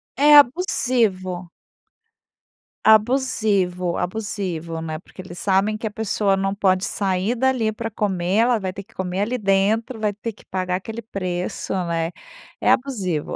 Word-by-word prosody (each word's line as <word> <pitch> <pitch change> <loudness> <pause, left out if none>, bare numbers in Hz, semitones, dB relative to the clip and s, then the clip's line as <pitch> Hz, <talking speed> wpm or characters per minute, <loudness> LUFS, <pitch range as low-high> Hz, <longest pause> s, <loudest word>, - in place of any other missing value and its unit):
É 295 +2 +6
abusivo. 230 - +2 1.3
Abusivo, 210 -6 +2
abusivo, 180 -5 -3
né. 155 -1 -4
Porque 185 - -12
eles 175 -1 -10
sabem 200 +2 +1
que 220 0 -4
a - - -5
pessoa 205 -2 0
não 195 0 0
pode 185 -2 +2
sair 195 +3 -1
dali 250 -3 +1
pra 225 +1 -5
comer, 190 -2 -1
ela 235 0 +3
vai 190 -1 -3
ter 195 +1 -8
que 225 - -26
comer 190 +1 -2
ali 240 +4 0
dentro, 215 +4 +1
vai 210 -1 0
ter 220 +3 -5
que 210 - -20
pagar 185 -1 -2
aquele 220 +5 -5
preço, 185 -5 -4
né. 165 0 -1 0.5
É - - +4
abusivo, 195 - -1
200 Hz, 150 wpm, -22 LUFS, 185-225 Hz, 1.3 s, É